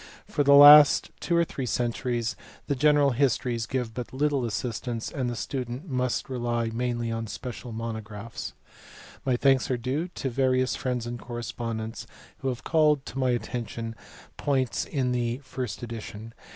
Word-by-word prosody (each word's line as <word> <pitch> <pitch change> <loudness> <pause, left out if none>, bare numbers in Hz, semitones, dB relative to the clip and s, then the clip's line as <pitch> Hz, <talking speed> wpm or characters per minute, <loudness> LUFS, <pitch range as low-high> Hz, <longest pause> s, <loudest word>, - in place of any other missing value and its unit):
For - - -1
the 140 0 +6
last 145 +1 +9
viii - - -30
PREFACE. - - -7
two 170 - +3
or 170 - +5
three 135 -5 -5
centuries 120 +1 -1 0.3
the 140 - 0
general 145 +1 +4
histories 120 -2 0
give 125 -4 -2
but 120 0 -6
little 140 -1 0
assistance, 115 +1 -3
and 130 -4 -2
the 120 - -3
student 125 +5 -4
must 125 -2 -1
rely 120 -3 -1
mainly 120 -1 -1
on 115 0 -3
special 125 +2 -7
monographs. 110 -1 -6 0.7
My 125 -2 +3
thanks 135 +1 +3
are 125 - +1
due 130 +8 -2
to; 140 -7 -4
various 130 0 +2
friends 125 -2 -2
and 120 0 -5
corre 120 +1 -6
spondents 115 -1 -5 0.3
who 135 - -4
have 125 -2 -3
eaUteS 150 -5 +2
my 130 -2 +2
atterition 115 -1 -5
to - - -12 0.4
points 130 -4 0
in 130 -5 -1
the 120 -1 0
first 125 -4 -5
edition. 115 -1 -7
125 Hz, 165 wpm, -27 LUFS, 115-135 Hz, 0.7 s, last